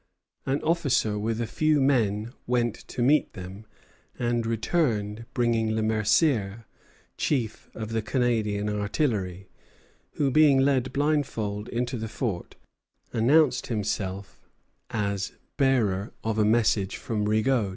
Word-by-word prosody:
An 135 Hz, +2 st, 0 dB
officer 135 Hz, -10 st, +1 dB
with 110 Hz, +2 st, -2 dB
a 120 Hz, -, 0 dB
few 155 Hz, +5 st, +1 dB
men 115 Hz, -5 st, +1 dB
went 120 Hz, -2 st, +1 dB
to 120 Hz, -, -2 dB
meet 150 Hz, +5 st, +3 dB
them, 95 Hz, +3 st, -9 dB, 0.5 s
and 120 Hz, -1 st, 0 dB
returned 115 Hz, -, -1 dB
bringing 115 Hz, -2 st, +1 dB
Le 110 Hz, -, 0 dB
Mercier, 110 Hz, -, +1 dB, 0.5 s
chief 120 Hz, -8 st, -1 dB
of 110 Hz, -1 st, -5 dB
the 115 Hz, 0 st, -1 dB
Canadian 110 Hz, -3 st, 0 dB
artillery, 105 Hz, -, -1 dB, 0.7 s
who, 140 Hz, -2 st, +1 dB
being 150 Hz, -1 st, +5 dB
led 135 Hz, -1 st, +2 dB
blindfold 125 Hz, -8 st, -1 dB
into 120 Hz, +1 st, -2 dB
the 110 Hz, 0 st, -4 dB
fort, 110 Hz, -5 st, -4 dB, 0.6 s
announced 130 Hz, +3 st, +3 dB
himself 100 Hz, -3 st, -4 dB, 0.4 s
as 100 Hz, -3 st, -2 dB, 0.2 s
bearer 110 Hz, -8 st, +1 dB
of 110 Hz, -1 st, -1 dB
a 105 Hz, -, +4 dB
message 110 Hz, -3 st, +2 dB
from 110 Hz, -5 st, -2 dB
Rigaud. 110 Hz, +1 st, +2 dB
115 Hz, 120 wpm, -26 LUFS, 105-130 Hz, 0.7 s, being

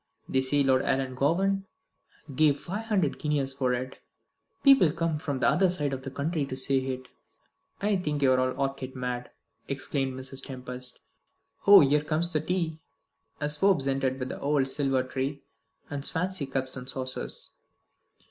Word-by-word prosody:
They 130 Hz, -, +1 dB
say 140 Hz, +2 st, +2 dB
Lord 130 Hz, -1 st, +3 dB
Ellangowan 165 Hz, +11 st, +1 dB, 0.7 s
gave 145 Hz, -1 st, +4 dB
five 205 Hz, +5 st, -5 dB
hundred 190 Hz, -10 st, 0 dB
guineas 145 Hz, -3 st, 0 dB
for 130 Hz, -2 st, 0 dB
it. 130 Hz, +1 st, -6 dB, 0.6 s
People 270 Hz, -, +7 dB
come 165 Hz, 0 st, -1 dB
from 145 Hz, -2 st, -3 dB
the -, -, +3 dB
other 190 Hz, 0 st, +4 dB
side 145 Hz, -6 st, -1 dB
of 130 Hz, -, -4 dB
the 135 Hz, -, -6 dB
county 150 Hz, +3 st, -2 dB
to 130 Hz, -, -5 dB
see 135 Hz, 0 st, +1 dB
it." 130 Hz, 0 st, -6 dB, 0.8 s
"I 205 Hz, -1 st, +2 dB
think 150 Hz, -5 st, -2 dB
you 130 Hz, -, +5 dB
are 130 Hz, -, +4 dB
all 130 Hz, +1 st, 0 dB
orchid 135 Hz, -1 st, -3 dB
mad," 125 Hz, -1 st, -4 dB, 0.4 s
exclaimed 135 Hz, -1 st, -2 dB
Mrs. 130 Hz, 0 st, -4 dB
Tempest. 125 Hz, -1 st, -7 dB, 0.7 s
"Oh, 200 Hz, 0 st, +10 dB
here 145 Hz, +1 st, +3 dB
comes 165 Hz, +3 st, 0 dB
the 155 Hz, -, +2 dB
tea!" 165 Hz, -2 st, -2 dB, 0.6 s
as 150 Hz, 0 st, -1 dB
Forbes 185 Hz, -7 st, +3 dB
entered 135 Hz, -1 st, 0 dB
with 130 Hz, -1 st, -4 dB
the -, -, -6 dB
old 140 Hz, -2 st, +2 dB
silver 135 Hz, -2 st, +1 dB
tray 135 Hz, +2 st, -4 dB, 0.4 s
and 145 Hz, -1 st, -5 dB
Swansea 180 Hz, -2 st, 0 dB
cups 130 Hz, -1 st, -1 dB
and 130 Hz, 0 st, -6 dB
saucers. 130 Hz, -1 st, -3 dB
140 Hz, 165 wpm, -28 LUFS, 130-155 Hz, 0.8 s, Oh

